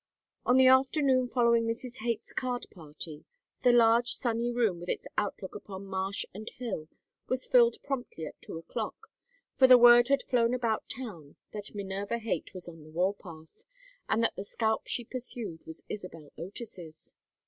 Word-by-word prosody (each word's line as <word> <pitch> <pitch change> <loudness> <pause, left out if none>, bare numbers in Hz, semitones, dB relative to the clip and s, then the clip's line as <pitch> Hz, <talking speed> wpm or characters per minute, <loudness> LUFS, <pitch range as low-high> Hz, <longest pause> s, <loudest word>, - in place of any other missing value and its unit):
On 250 - +5
the 260 - +7
afternoon 260 0 +4
following 235 -2 +3
Mrs. 235 +2 -4
Haight's 235 -1 -3
card 250 -1 -2
party 155 -2 -9 0.4
the 245 - +5
large 235 0 +4
sunny 235 0 0
room 225 -7 +1
with 175 +1 -8
its - - -2
outlook 200 -2 -3
upon 195 -1 -8
marsh 195 +1 -1
and 215 +3 -7
hill 220 -11 -5 0.4
was 255 0 0
filled 235 -2 +5
promptly 245 - -4
at - - -10
two - - -7
o'clock; 165 - -6 0.4
for 260 - +6
the 255 -1 +10
word 240 0 +8
had 275 +1 +2
flown 240 -1 +2
about 230 -3 -1
town 185 - -7 0.2
that 210 0 -4
Minerva 200 +2 -3
Haight 230 -1 -3
was 185 -2 -3
on 165 -2 -10
the 155 - -14
war 180 +5 +1
path 160 -5 -13 0.5
and 225 +1 +2
that - - +1
the - - -5
scalp 220 +2 -1
she 240 - -1
pursued 230 -8 -4
was 160 - -8
Isabel 165 -7 -8
Otis's. 175 -3 -9
225 Hz, 170 wpm, -30 LUFS, 185-245 Hz, 0.5 s, the